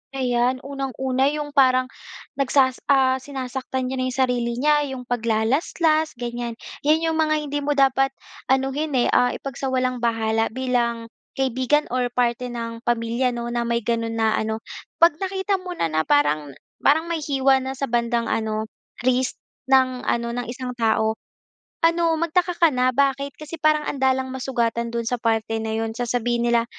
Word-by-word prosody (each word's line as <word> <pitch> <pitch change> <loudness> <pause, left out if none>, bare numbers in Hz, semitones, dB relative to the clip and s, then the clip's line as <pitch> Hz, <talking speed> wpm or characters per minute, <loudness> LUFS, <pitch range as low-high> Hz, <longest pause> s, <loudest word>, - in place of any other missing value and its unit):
Ayan. 250 -1 0
Unang-una 265 -1 -1
'yong 295 0 -2
parang, 255 -2 +3 0.5
nagsas 265 -1 +3
ah, 265 -2 +4
sinasaktan 260 -1 -4
niya - - -2
na - - 0
'yong 255 - -4
sarili 245 -2 +1
niya, 295 +3 +2
'yong 265 -2 -6
paglalaslas 255 +7 +1
ganyan. 240 -1 -4 0.3
'Yan 315 +2 +4
'yong 325 -1 0
mga 310 -1 +3
hindi 290 0 -2
mo 290 0 -1
dapat 270 0 +3 0.3
anuhin 270 +3 0
eh, 245 - +2
ah, 245 - +3
ipagsawalang-bahala 240 -4 -1
bilang 235 -3 -1 0.2
kaibigan 265 +3 +1
or 250 0 +1
parte 245 0 0
ng 230 -1 -5
pamilya 240 +1 0
'no, 235 0 -4
na 235 0 -1
may 235 -1 0
gano'n 230 0 -1
na 225 -1 +2
ano. 220 +1 -3 0.3
'Pag 335 -2 +4
nakita 385 +1 -1
mo 365 -1 -7
na, 165 - -1
na 155 0 0
parang 145 -1 +2 0.2
parang 320 +4 +3
may 330 - -1
hiwa 270 -2 +2
na 265 +1 -5
sa 270 - -6
bandang 235 -1 0
ano, 220 -1 -1 0.4
wrist, 255 0 +1 0.3
ng 260 -1 +2
ano, 235 0 0
ng 245 0 -4
isang 250 +1 -5
tao, 220 -1 +1 0.7
ano, 335 0 +3
magtaka 345 +2 +1
ka 335 - +5
na, 255 0 +2
bakit? 275 +1 +1
Kasi 305 +2 -8
parang 305 -1 +3
andalang 265 -1 0
masugatan 235 -3 -1
do'n 235 0 -2
sa 245 - 0
parte 225 -1 0
na 220 0 -3
'yon. 225 0 -2
Sasabihin 240 -1 0
nila, 235 -1 +3
255 Hz, 160 wpm, -23 LUFS, 235-275 Hz, 0.7 s, ka